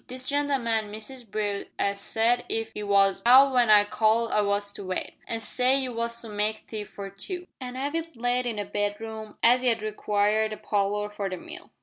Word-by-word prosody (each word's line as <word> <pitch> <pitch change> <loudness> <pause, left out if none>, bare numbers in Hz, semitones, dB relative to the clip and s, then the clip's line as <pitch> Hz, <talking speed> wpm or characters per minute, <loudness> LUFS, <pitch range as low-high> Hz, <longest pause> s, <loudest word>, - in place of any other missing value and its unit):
This 255 0 -7
gen'leman, 255 -7 0
Mr 225 +2 -8
Brute, 205 -1 -2
'e 200 - +1
said 225 +4 +1
if 225 0 -3
'e 210 - -4
was 200 -1 +3
hout 260 +3 +8
w'en 245 -3 +3
I 210 -1 +8
called 220 +2 +1
I 210 - +3
was 205 0 -1
to - - -7
wait, 185 -1 -4
an' 225 0 -3
say 255 +3 +2
you 255 -2 -3
was 235 0 -3
to 225 - -8
make 210 +1 -1
tea 215 -2 -5
for 195 -1 -8
two, 355 - -5
an' 255 -1 -6
'ave 285 +5 -1
it 330 -2 -9
laid 245 +1 0
in 230 - -2
the 205 -1 -3
bedroom 215 +1 -4
as 245 +2 +5
'e'd 230 -3 +1
require 210 0 +1
the 215 - -6
parlour 205 0 0
for 205 -1 -3
the 185 - -4
mill." - - -11
220 Hz, 210 wpm, -26 LUFS, 205-245 Hz, -, hout